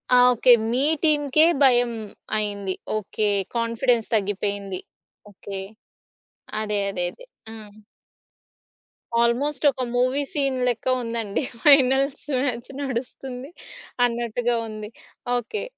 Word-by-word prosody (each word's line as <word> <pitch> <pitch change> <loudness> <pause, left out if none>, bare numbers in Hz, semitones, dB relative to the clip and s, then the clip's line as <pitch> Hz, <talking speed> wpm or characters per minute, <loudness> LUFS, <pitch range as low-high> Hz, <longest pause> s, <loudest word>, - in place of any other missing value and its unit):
ఆ! - - +7 0.2
ఓకే. 245 +2 +4 0.2
మీ 255 +3 +2 0.2
టీమ్‌కే 300 0 +4 0.2
భయం 245 -2 +4 0.5
అయింది. 200 -3 -2 0.2
ఓకే. 210 0 -1 0.3
కాన్ఫిడెన్స్ 230 0 +1
తగ్గిపోయింది. 200 -2 -2 0.5
ఓకే. 195 0 -7 1.0
అదే. 210 -1 -1
అదే. 180 -2 -2
అదే. - - -15 0.2
హ్మ్. 215 -2 -10 1.5
ఆల్మోస్ట్ 265 +5 +1
ఒక 260 -1 -7
మూవీ 255 +3 +2
సీన్ 275 -5 0
లెక్క 245 +1 -2
ఉందండి. 230 0 -2 0.2
ఫైనల్స్ 275 0 +4 0.2
మ్యాచ్ 240 -3 -3
నడుస్తుంది 260 +1 -5 0.5
అన్నట్టుగా 240 0 -1
ఉంది. 215 0 -7 0.5
ఓకే. 245 - -4
240 Hz, 100 wpm, -23 LUFS, 215-270 Hz, 1.5 s, ఆ